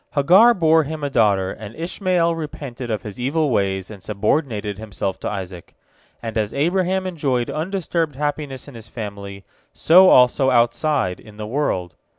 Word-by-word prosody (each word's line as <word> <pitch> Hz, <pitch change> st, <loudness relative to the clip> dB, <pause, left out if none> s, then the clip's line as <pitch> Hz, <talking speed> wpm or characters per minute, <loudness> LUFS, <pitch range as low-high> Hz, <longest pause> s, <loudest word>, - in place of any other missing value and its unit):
Hagar 190 Hz, +12 st, +6 dB
bore 160 Hz, -2 st, +4 dB
him 155 Hz, +1 st, -6 dB
a 140 Hz, -, -2 dB
daughter, 100 Hz, -6 st, +2 dB
and 105 Hz, +2 st, -9 dB
Ishmael 170 Hz, 0 st, 0 dB
repented 140 Hz, -6 st, -7 dB
of 110 Hz, -2 st, -2 dB
his 105 Hz, +2 st, -8 dB
evil 145 Hz, +3 st, 0 dB
ways 95 Hz, -2 st, -1 dB
and 100 Hz, -3 st, -11 dB
subordinated 105 Hz, -, -2 dB
himself 100 Hz, -3 st, -4 dB
to -, -, -3 dB
Isaac. 95 Hz, -4 st, -7 dB, 0.5 s
And 115 Hz, -1 st, -2 dB
as 105 Hz, -1 st, -3 dB
Abraham 185 Hz, +5 st, 0 dB
enjoyed 140 Hz, -9 st, -1 dB
undisturbed 165 Hz, -2 st, -2 dB
happiness 145 Hz, -2 st, -4 dB
in 140 Hz, -, -11 dB
his 115 Hz, -2 st, -11 dB
family, 100 Hz, -3 st, -8 dB, 0.3 s
so 185 Hz, +3 st, +6 dB
also 125 Hz, +2 st, +5 dB
outside, 120 Hz, -, +1 dB
in 105 Hz, -1 st, -15 dB
the 105 Hz, -, -5 dB
world. 105 Hz, -, -2 dB
130 Hz, 160 wpm, -21 LUFS, 105-160 Hz, 0.5 s, Hagar